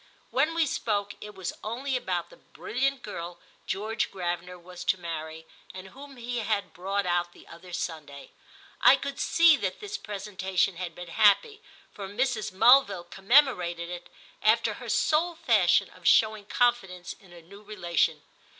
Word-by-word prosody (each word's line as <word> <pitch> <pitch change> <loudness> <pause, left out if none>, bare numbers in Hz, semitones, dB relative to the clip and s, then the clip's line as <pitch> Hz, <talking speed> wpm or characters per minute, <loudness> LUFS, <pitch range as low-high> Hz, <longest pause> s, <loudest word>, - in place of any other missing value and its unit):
When 305 +5 +1
we 330 -1 +3
spoke 205 -7 -2
it 210 0 -10
was 185 -2 -5
only 255 +5 -3
about 180 -8 -2
the - - -15
brilliant 270 +3 -3
girl 175 -3 -7 0.3
George 215 +4 -2
Gravener 180 -1 -4
was 180 0 -10
to 190 - +2
marry 160 -2 -6 0.3
and 190 +1 -9
whom 275 +4 -13
he 240 0 -4
had 205 -3 -2
brought 195 +3 -2
out 175 0 0
the - - -17
other 175 +2 -13
Sunday. 150 -5 -6 0.5
I - - +8
could 275 0 -6
see 335 -2 +5
that 190 -6 -3
this 415 0 -6
presentation 190 -3 -2
had 175 -2 -5
been 175 -1 -9
happy, 215 - +3 0.3
for 200 -2 -7
Mrs. 220 0 -1
Mulville 205 -2 +5
commemorated 190 - +2
it 175 0 -8 0.3
after - - +3
her - - -9
sole 330 +3 +1
fashion - - +3
of - - -7
showing 215 -2 +4
confidence 195 -8 0
in 190 - -20
a 170 -1 -14
new 200 +5 -14
relation. 175 -6 -1
200 Hz, 160 wpm, -27 LUFS, 175-245 Hz, 0.5 s, I